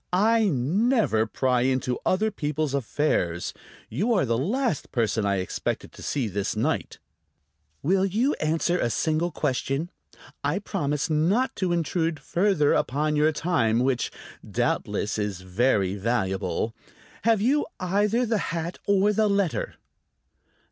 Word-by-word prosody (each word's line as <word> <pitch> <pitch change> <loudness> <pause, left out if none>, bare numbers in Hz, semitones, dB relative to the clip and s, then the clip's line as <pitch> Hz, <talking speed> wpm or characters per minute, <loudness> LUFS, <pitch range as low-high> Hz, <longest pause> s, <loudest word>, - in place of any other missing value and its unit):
"I 220 +5 +3
never 165 - +2
pry 125 +1 +1
into 130 -1 0
other 215 +4 +2
people's 150 -5 -2
affairs. 115 - 0 0.3
You 200 - 0
are 185 - +2
the 115 -1 +1
last 205 - -1
person 110 -3 0
I 100 - +2
expected 95 -1 -3
to - - -13
see 135 -6 -1
this 100 0 -2
night." - - -1 0.9
"Will 190 +5 +3
you 230 +9 +1
answer 165 +3 +1
a 120 - +1
single 155 - 0
question? 145 +1 -2 0.5
I 145 +5 +1
promise 150 -8 -1
not 185 +12 +2
to 185 -3 0
intrude 165 -1 0
further 175 -5 +2
upon 150 +4 0
your 150 +1 +4
time, 145 -9 +1
which, 125 0 +1 0.3
doubtless, 105 +1 -1
is 100 -3 -2
very 95 0 +1
valuable. 105 0 -1 0.5
Have 225 -1 +4
you 270 +8 +2
either 205 +6 +1
the 225 -2 0
hat 165 +1 -4
or 200 +1 +3
the 215 +1 +3
letter?" 200 -4 0
155 Hz, 135 wpm, -26 LUFS, 125-195 Hz, 0.9 s, your